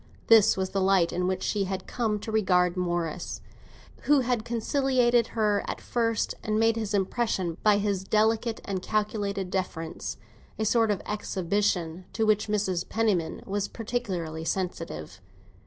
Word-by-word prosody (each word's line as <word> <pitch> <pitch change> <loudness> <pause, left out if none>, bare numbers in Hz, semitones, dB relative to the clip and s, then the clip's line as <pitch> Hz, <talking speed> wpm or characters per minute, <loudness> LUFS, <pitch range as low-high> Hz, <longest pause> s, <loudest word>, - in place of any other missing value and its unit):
This 225 -4 +7
was 190 0 -1
the 195 - 0
light 190 -3 +3
in 180 +1 0
which 185 0 -1
she 205 -2 0
had 190 0 -4
come 225 -4 -1
to 220 - -5
regard 180 -4 +3
Morris, 175 -2 -2 0.7
who 290 -2 +5
had 245 -3 0
conciliated 240 0 +2
her 210 -2 +2
at - - -3
first, 230 -2 0
and 215 0 0
made 225 0 +3
his 215 -2 -2
impression 190 -4 0
by 210 -1 +5
his 200 -2 -1
delicate 220 +3 +1
and 190 -2 -3
calculated 205 -2 -1
deference—a 185 +3 -5
sort 225 0 +3
of 205 -3 -1
exhibition 185 -3 -1
to 225 - +1
which 215 0 +2
Mrs. 195 -4 -1
Penniman 205 -8 0
was 200 0 -2
particularly 190 -9 -3
sensitive. 165 - -4
205 Hz, 145 wpm, -27 LUFS, 185-220 Hz, 0.7 s, This